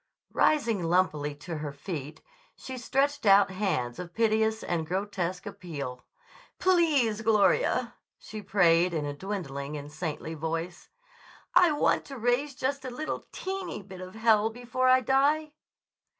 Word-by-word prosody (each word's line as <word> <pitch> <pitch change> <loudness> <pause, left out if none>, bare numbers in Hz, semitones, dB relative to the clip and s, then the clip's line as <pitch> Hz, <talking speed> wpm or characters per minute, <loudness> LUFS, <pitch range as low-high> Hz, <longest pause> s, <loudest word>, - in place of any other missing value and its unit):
Rising 235 -10 +2
lumpily 165 -4 +1
to 165 0 -5
her 150 -1 -4
feet, 145 0 -7 0.3
she 260 - -8
stretched 275 +4 0
out 195 0 +6
hands 185 -12 -2
of 175 -1 -8
piteous 220 -1 +2
and 165 -2 -2
grotesque 185 0 -2
appeal. 145 -11 -6 0.6
"Please, 300 - +3
Gloria," 220 - +2 0.2
she 215 -1 -8
prayed 180 -3 +3
in 150 -2 -1
a 145 - -3
dwindling 150 -5 -5
and 145 0 -8
saintly 155 0 -4
voice, 165 +3 -4 0.6
"I 355 -2 +6
want 295 - +2
to 275 - -8
raise 245 +4 0
just 265 +1 -2
a 260 - -4
little 300 +5 -5
teeny 380 - -5
bit 190 -1 -10
of 185 +2 -9
hell 220 -1 +3
before 245 +2 -1
I 255 0 +6
die." 285 +5 +2
200 Hz, 140 wpm, -28 LUFS, 165-255 Hz, 0.6 s, out